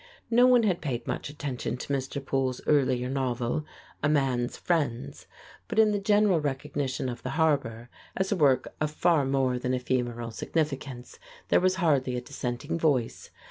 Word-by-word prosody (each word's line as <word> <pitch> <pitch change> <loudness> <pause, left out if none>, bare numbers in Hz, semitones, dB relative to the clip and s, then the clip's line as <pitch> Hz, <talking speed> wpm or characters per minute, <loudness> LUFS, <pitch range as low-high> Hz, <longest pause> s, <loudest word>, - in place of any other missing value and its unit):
No 245 +2 +6
one 250 -2 +5
had 190 -5 +1
paid 125 -5 -3
much - - -3
attention 140 -4 -4
to 140 - -4
Mr. 135 +1 -3
Poole's 130 -2 -1
earlier 130 -4 +2
novel, 130 +2 -1 0.4
"A 145 - +2
Man's 130 -5 +1
Friends," 145 -8 -2 0.4
but 220 - -5
in 220 -1 +6
the 205 - 0
general 205 -4 +3
recognition 140 -2 -2
of 120 -1 -5
"The - - -4
Harbor," 140 -8 +1 0.3
as 190 +1 0
a - - +3
work 135 -6 +2
of 155 - +1
far 155 -1 +2
more 135 -2 +1
than 125 +1 -1
ephemeral 120 -2 -2
significance, 135 -2 -3 0.3
there - - +5
was 185 0 +3
hardly 140 -8 +1
a - - -3
dissenting 125 +6 -4
voice. 140 -8 0
135 Hz, 165 wpm, -28 LUFS, 125-160 Hz, 0.4 s, No